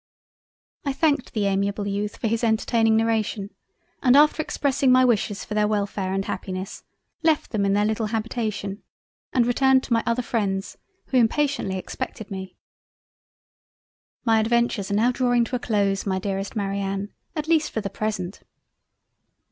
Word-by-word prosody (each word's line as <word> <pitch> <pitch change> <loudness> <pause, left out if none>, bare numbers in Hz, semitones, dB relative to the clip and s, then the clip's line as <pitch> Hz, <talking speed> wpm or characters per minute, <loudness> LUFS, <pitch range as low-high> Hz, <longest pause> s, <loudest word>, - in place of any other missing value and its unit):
I 280 -2 -1
thanked 285 -3 +1
the 210 -3 0
amiable 200 +1 0
Youth 205 +1 -2
for - - -5
his 230 +2 -1
entertaining 225 0 +3
narration, 220 -3 0 0.5
and 260 0 +5
after 300 +1 +5
expressing 275 -3 +1
my 255 0 +6
wishes 210 -4 0
for - - -6
their 210 0 +2
Welfare 200 -2 -1
and 195 0 -1
Happiness, 185 +1 -5 0.4
left 320 -2 +1
them 200 -3 +1
in 195 - +2
their 205 +1 +3
little 220 0 0
Habitation 215 -3 -3 0.5
and 245 -2 +3
returned 265 +2 +3
to 240 - -1
my 230 - +3
other 235 +2 +1
Freinds 195 -5 -2 0.3
who 260 - +2
impatiently 250 -4 +1
expected 220 +2 -6
me. 190 -1 -6 1.7
My 225 -1 +4
adventures 230 -2 +1
are 200 - 0
now 230 +4 +3
drawing 245 -1 +2
to 240 +2 -3
a - - -1
close 200 -4 0
my 190 -1 +1
dearest 195 +1 -3
Marianne; 195 0 -2 0.2
at 305 -1 -3
least 320 -2 +3
for 220 - -3
the 200 - -3
present. 200 -3 -3
220 Hz, 155 wpm, -24 LUFS, 200-245 Hz, 1.7 s, my